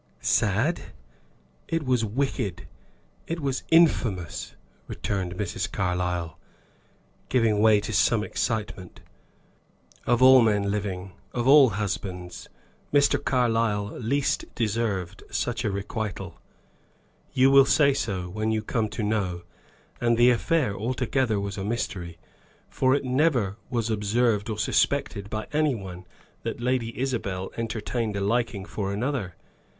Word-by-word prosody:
"Sad? 115 Hz, -, +1 dB, 0.9 s
It 165 Hz, -1 st, -1 dB
was 125 Hz, -3 st, +2 dB
wicked 110 Hz, -5 st, -2 dB, 0.6 s
it 165 Hz, +1 st, -3 dB
was 135 Hz, -3 st, -2 dB
infamous!" 115 Hz, -, +2 dB, 0.3 s
returned 95 Hz, -3 st, -3 dB
Mrs. 100 Hz, -1 st, -3 dB
Carlyle, 90 Hz, -2 st, -2 dB, 0.9 s
giving 115 Hz, -4 st, +2 dB
way 110 Hz, -1 st, +5 dB
to 105 Hz, -, -5 dB
some 110 Hz, -3 st, +3 dB
excitement. 105 Hz, -6 st, -3 dB, 1.1 s
"Of 120 Hz, +1 st, +3 dB
all 130 Hz, 0 st, +9 dB
men 105 Hz, -3 st, +2 dB
living, 95 Hz, -2 st, -3 dB, 0.2 s
of 120 Hz, 0 st, -1 dB
all 140 Hz, -2 st, +8 dB
husbands, 95 Hz, -3 st, -5 dB, 0.4 s
Mr. 145 Hz, -1 st, +3 dB
Carlyle 115 Hz, -5 st, +1 dB
least 135 Hz, +4 st, 0 dB
deserved 105 Hz, -5 st, -2 dB
such 120 Hz, 0 st, -2 dB
a 105 Hz, -, +1 dB
requital. 100 Hz, +1 st, -5 dB, 0.9 s
You 130 Hz, +1 st, +4 dB
will 135 Hz, 0 st, +8 dB
say 140 Hz, 0 st, +4 dB
so 95 Hz, -8 st, -2 dB
when 110 Hz, +4 st, -2 dB
you 110 Hz, -1 st, 0 dB
come 110 Hz, 0 st, -1 dB
to 110 Hz, -, -4 dB
know. 100 Hz, -5 st, -1 dB, 0.6 s
And 120 Hz, -1 st, +2 dB
the 120 Hz, +1 st, +6 dB
affair 125 Hz, -, +1 dB
altogether 120 Hz, 0 st, 0 dB
was 100 Hz, 0 st, -4 dB
a -, -, -3 dB
mystery; 95 Hz, -6 st, -3 dB, 0.5 s
for 130 Hz, 0 st, +2 dB
it 140 Hz, -, -2 dB
never 125 Hz, -7 st, +1 dB
was 115 Hz, -3 st, -1 dB
observed 105 Hz, +1 st, +1 dB
or 110 Hz, -, -3 dB
suspected 105 Hz, -3 st, 0 dB
by 110 Hz, 0 st, -3 dB
any 150 Hz, -3 st, +2 dB
one 90 Hz, -3 st, -8 dB, 0.3 s
that -, -, -4 dB
Lady 120 Hz, -1 st, -1 dB
Isabel 100 Hz, -8 st, -2 dB
entertained 115 Hz, -1 st, -3 dB
a 100 Hz, -, -2 dB
liking 115 Hz, -1 st, 0 dB
for 100 Hz, -1 st, -4 dB
another. 110 Hz, -, -2 dB
110 Hz, 125 wpm, -26 LUFS, 100-125 Hz, 1.1 s, all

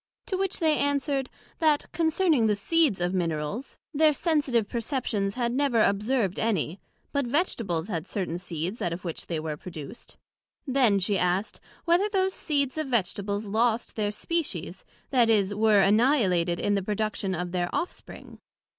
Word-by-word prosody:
To 385 Hz, -, -2 dB
which 385 Hz, 0 st, -1 dB
they 315 Hz, -3 st, +2 dB
answered, 280 Hz, -1 st, 0 dB, 0.3 s
That 310 Hz, -3 st, +3 dB
concerning 320 Hz, -6 st, +2 dB
the 210 Hz, -, +2 dB
seeds 295 Hz, -, +2 dB
of 175 Hz, +1 st, 0 dB
Minerals, 170 Hz, -, -2 dB, 0.2 s
their 305 Hz, +1 st, +4 dB
sensitive 280 Hz, -, +1 dB
perceptions 225 Hz, -5 st, -2 dB
had 240 Hz, -2 st, 0 dB
never 260 Hz, -5 st, +2 dB
observed 205 Hz, 0 st, +1 dB
any; 195 Hz, -5 st, -1 dB, 0.3 s
but 280 Hz, -3 st, 0 dB
Vegetables 230 Hz, -, -1 dB
had 175 Hz, -4 st, -4 dB
certain 180 Hz, -4 st, -3 dB
seeds 180 Hz, +3 st, -4 dB
out 170 Hz, -, -1 dB
of 180 Hz, +2 st, -8 dB
which 165 Hz, -, -5 dB
they 165 Hz, -2 st, -2 dB
were 155 Hz, -1 st, -3 dB
produced. 160 Hz, +5 st, -10 dB, 0.5 s
Then 255 Hz, -7 st, +3 dB
she 195 Hz, 0 st, 0 dB
asked, 180 Hz, +3 st, 0 dB, 0.3 s
whether 355 Hz, +5 st, +3 dB
those 380 Hz, -2 st, +1 dB
seeds 285 Hz, -2 st, -1 dB
of 310 Hz, -, -2 dB
Vegetables 205 Hz, -2 st, -1 dB
lost 225 Hz, +3 st, 0 dB
their 210 Hz, -2 st, 0 dB
Species, 210 Hz, -, -3 dB, 0.3 s
that 245 Hz, -4 st, +4 dB
is, 205 Hz, -3 st, +3 dB
were 210 Hz, -1 st, +4 dB
annihilated 195 Hz, -, +3 dB
in 205 Hz, -, +1 dB
the 200 Hz, -, +1 dB
production 210 Hz, -1 st, -2 dB
of 175 Hz, +1 st, -4 dB
their 175 Hz, -1 st, -1 dB
off 350 Hz, -, -1 dB
spring? -, -, -13 dB
215 Hz, 160 wpm, -27 LUFS, 185-280 Hz, 0.5 s, their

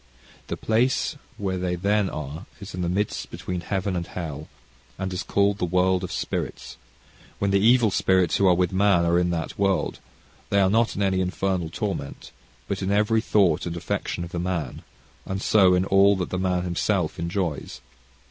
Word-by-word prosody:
The -, -, -4 dB
place 120 Hz, +4 st, +1 dB, 0.2 s
where 95 Hz, -2 st, -2 dB
they 90 Hz, -1 st, -1 dB
then 100 Hz, +2 st, +1 dB
are, 75 Hz, +4 st, -6 dB
is 100 Hz, 0 st, -9 dB
in 90 Hz, -, -4 dB
the 85 Hz, -, 0 dB
midst 100 Hz, +3 st, -2 dB
between 90 Hz, -1 st, -5 dB
heaven 95 Hz, +1 st, -2 dB
and 85 Hz, -1 st, -3 dB
hell, 80 Hz, -4 st, -6 dB, 0.5 s
and 95 Hz, -1 st, -3 dB
is 90 Hz, -, -2 dB
called 100 Hz, 0 st, +1 dB
the -, -, -2 dB
world 90 Hz, +1 st, +2 dB
of 90 Hz, -, -4 dB
spirits -, -, -4 dB, 0.6 s
when 100 Hz, -1 st, 0 dB
the 100 Hz, -, +4 dB
evil 115 Hz, +1 st, +4 dB
spirits 95 Hz, -1 st, +2 dB
who 100 Hz, -, +3 dB
are 90 Hz, -, +5 dB
with 90 Hz, 0 st, 0 dB
man, 95 Hz, -3 st, +3 dB
are 85 Hz, +1 st, +3 dB
in 90 Hz, 0 st, +1 dB
that 85 Hz, +1 st, -3 dB
world, 100 Hz, -2 st, +1 dB, 0.5 s
they 100 Hz, -, +3 dB
are 95 Hz, -1 st, +3 dB
not 115 Hz, +2 st, +2 dB
in 100 Hz, -, 0 dB
any 95 Hz, -1 st, +1 dB
infernal 90 Hz, -2 st, -1 dB
torment, 90 Hz, -7 st, -5 dB, 0.4 s
but 100 Hz, 0 st, -3 dB
in 95 Hz, -, -1 dB
every 105 Hz, +2 st, +3 dB
thought 95 Hz, -8 st, +2 dB
and 85 Hz, 0 st, -4 dB
affection 90 Hz, 0 st, -3 dB
of 85 Hz, -, -9 dB
man, 85 Hz, -5 st, -3 dB, 0.4 s
and 95 Hz, 0 st, -4 dB
so, 95 Hz, -3 st, +4 dB
in 90 Hz, +1 st, +1 dB
all 100 Hz, +1 st, +5 dB
that 90 Hz, -2 st, -3 dB
the 90 Hz, -, -1 dB
man 90 Hz, -1 st, 0 dB
himself 90 Hz, -1 st, -1 dB
enjoys. 85 Hz, -6 st, -3 dB
95 Hz, 185 wpm, -24 LUFS, 90-100 Hz, 0.6 s, are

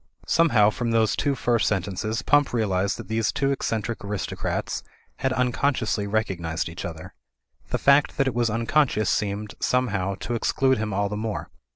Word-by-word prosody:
Somehow 115 Hz, -11 st, +4 dB
from 120 Hz, +2 st, -2 dB
those 115 Hz, -1 st, +2 dB
two 140 Hz, -1 st, 0 dB
first 120 Hz, -5 st, +1 dB
sentences 105 Hz, +4 st, -1 dB
Pump 145 Hz, -2 st, +3 dB
realised 100 Hz, -4 st, 0 dB
that 115 Hz, -, -8 dB
these 110 Hz, 0 st, 0 dB
two 140 Hz, 0 st, 0 dB
eccentric 115 Hz, -4 st, -2 dB
aristocrats 100 Hz, -1 st, -3 dB, 0.4 s
had 135 Hz, -, 0 dB
un 125 Hz, -1 st, +1 dB
consciously 115 Hz, -7 st, 0 dB
recognised 90 Hz, -7 st, -1 dB
each 85 Hz, -, -7 dB
other. 80 Hz, -2 st, -7 dB, 0.6 s
The -, -, 0 dB
fact 140 Hz, +1 st, +4 dB
that 135 Hz, -, +3 dB
it 130 Hz, -, 0 dB
was 120 Hz, 0 st, +1 dB
unconscious 115 Hz, -1 st, +1 dB
seemed, 105 Hz, 0 st, -2 dB
somehow, 100 Hz, -7 st, 0 dB
to 120 Hz, -, -3 dB
exclude 130 Hz, +2 st, +1 dB
him 110 Hz, -1 st, -2 dB
all 100 Hz, +1 st, 0 dB
the 105 Hz, +1 st, -4 dB
more. 110 Hz, 0 st, -4 dB
110 Hz, 170 wpm, -25 LUFS, 100-125 Hz, 0.6 s, Somehow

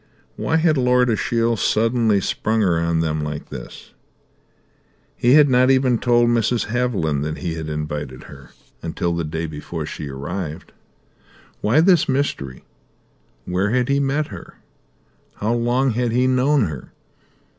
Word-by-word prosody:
Why 160 Hz, -, -1 dB
had 160 Hz, -2 st, +2 dB
Lord 125 Hz, -1 st, +3 dB
Ashiel 115 Hz, +2 st, 0 dB
suddenly 115 Hz, -1 st, +2 dB
sprung 110 Hz, +4 st, -1 dB
her 90 Hz, -5 st, +2 dB
on 85 Hz, 0 st, 0 dB
them 80 Hz, -1 st, -1 dB
like 75 Hz, 0 st, -5 dB
this? -, -, -10 dB, 1.2 s
He 120 Hz, +1 st, +3 dB
had 150 Hz, 0 st, +7 dB
not 130 Hz, -1 st, +4 dB
even 130 Hz, -3 st, +3 dB
told 120 Hz, -1 st, +3 dB
Mrs. 115 Hz, -2 st, +1 dB
Haviland 95 Hz, -, 0 dB
that 75 Hz, +1 st, -3 dB
he 85 Hz, -3 st, -3 dB
had 80 Hz, -1 st, -5 dB
invited 75 Hz, -4 st, -5 dB
her 70 Hz, -2 st, -13 dB, 0.3 s
until 85 Hz, +1 st, -2 dB
the 85 Hz, -, -2 dB
day 80 Hz, +2 st, -3 dB
before 75 Hz, +1 st, -6 dB
she 75 Hz, -1 st, -6 dB
arrived. 75 Hz, +4 st, -6 dB, 0.9 s
Why 125 Hz, +9 st, +3 dB
this 175 Hz, -4 st, +4 dB
mystery? 130 Hz, -, -2 dB, 0.8 s
Where 90 Hz, +3 st, 0 dB
had 125 Hz, +2 st, 0 dB
he 140 Hz, 0 st, +2 dB
met 140 Hz, +2 st, 0 dB
her? 95 Hz, -6 st, -10 dB, 0.8 s
How 110 Hz, +3 st, -1 dB
long 120 Hz, +3 st, +1 dB
had 120 Hz, +1 st, -1 dB
he 125 Hz, +2 st, +2 dB
known 130 Hz, +2 st, +3 dB
her? 75 Hz, -7 st, -7 dB
110 Hz, 145 wpm, -21 LUFS, 80-125 Hz, 1.2 s, had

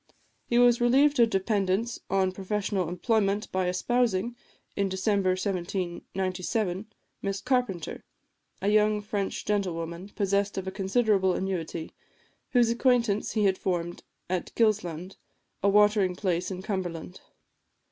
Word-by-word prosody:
He 240 Hz, -, +1 dB
was 245 Hz, -1 st, +5 dB
relieved 275 Hz, +4 st, +4 dB
of 230 Hz, -1 st, +6 dB
dependence 195 Hz, +2 st, 0 dB
on 190 Hz, -1 st, +2 dB
professional 195 Hz, -1 st, -2 dB
employment 205 Hz, +2 st, 0 dB
by 185 Hz, -1 st, 0 dB
espousing, 235 Hz, +3 st, 0 dB, 0.4 s
in 200 Hz, -1 st, 0 dB
December 190 Hz, 0 st, +1 dB
1797, 185 Hz, +1 st, -2 dB, 0.3 s
Miss 195 Hz, 0 st, -2 dB
Carpenter, 245 Hz, -, -1 dB, 0.6 s
a 200 Hz, -, +2 dB
young 210 Hz, 0 st, +3 dB
French 205 Hz, -1 st, -3 dB
gentlewoman, 180 Hz, -3 st, -2 dB
possessed 200 Hz, 0 st, 0 dB
of 190 Hz, -, -3 dB
a -, -, -2 dB
considerable 195 Hz, -1 st, +2 dB
annuity, 170 Hz, -4 st, -3 dB, 0.6 s
whose 240 Hz, -2 st, +3 dB
acquaintance 235 Hz, -4 st, +2 dB
he 215 Hz, -2 st, +2 dB
had 190 Hz, -1 st, +2 dB
formed 175 Hz, -2 st, -2 dB, 0.3 s
at 185 Hz, -1 st, -2 dB
Gilsland, 190 Hz, -5 st, 0 dB, 0.4 s
a 200 Hz, -, +3 dB
watering 205 Hz, -2 st, +4 dB
place 180 Hz, -2 st, -1 dB
in 185 Hz, -1 st, -6 dB
Cumberland. 180 Hz, -3 st, -4 dB
195 Hz, 120 wpm, -27 LUFS, 185-215 Hz, 0.6 s, of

